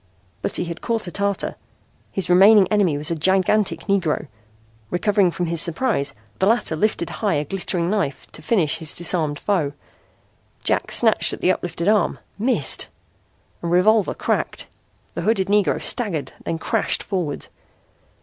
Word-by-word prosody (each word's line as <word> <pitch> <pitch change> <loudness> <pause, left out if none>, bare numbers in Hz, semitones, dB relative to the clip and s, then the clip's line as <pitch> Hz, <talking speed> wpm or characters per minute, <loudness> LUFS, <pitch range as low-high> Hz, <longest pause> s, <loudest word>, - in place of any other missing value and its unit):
But - - -2
he - - -1
had 170 -1 -7
caught 230 -2 -1
a 175 - -6
tartar. 200 +1 -1 0.6
His 190 -2 -2
remaining 195 +2 +6
enemy 195 -8 +2
was 150 +3 -1
a - - 0
gigantic 190 +5 +2
Negro. 185 -7 0 0.6
Recovering 200 +1 +2
from 175 +1 -3
his 170 -1 +1
surprise 165 - 0 0.2
the 190 - +2
latter 225 -7 +1
lifted 170 -1 -1
high 205 -6 +1
a 145 +1 -1
glittering 180 0 -2
knife 175 -11 -2
to - - -9
finish 165 -8 +1
his 160 -3 -6
disarmed 160 -4 -1
foe. 165 -8 -1 0.9
Jack - - +1
snatched - - +3
at - - -7
the 185 - +4
uplifted 175 -1 -3
arm 215 0 +2 0.2
missed! 225 - +2 0.7
A 170 - -4
revolver 190 +4 +3
cracked. - - -2 0.5
The - - -4
hooded 200 -3 +1
Negro 205 -1 +2
staggered, 165 - -2
then 165 - -2
crashed - - 0
forward. 180 -7 -3
180 Hz, 150 wpm, -21 LUFS, 165-205 Hz, 0.9 s, remaining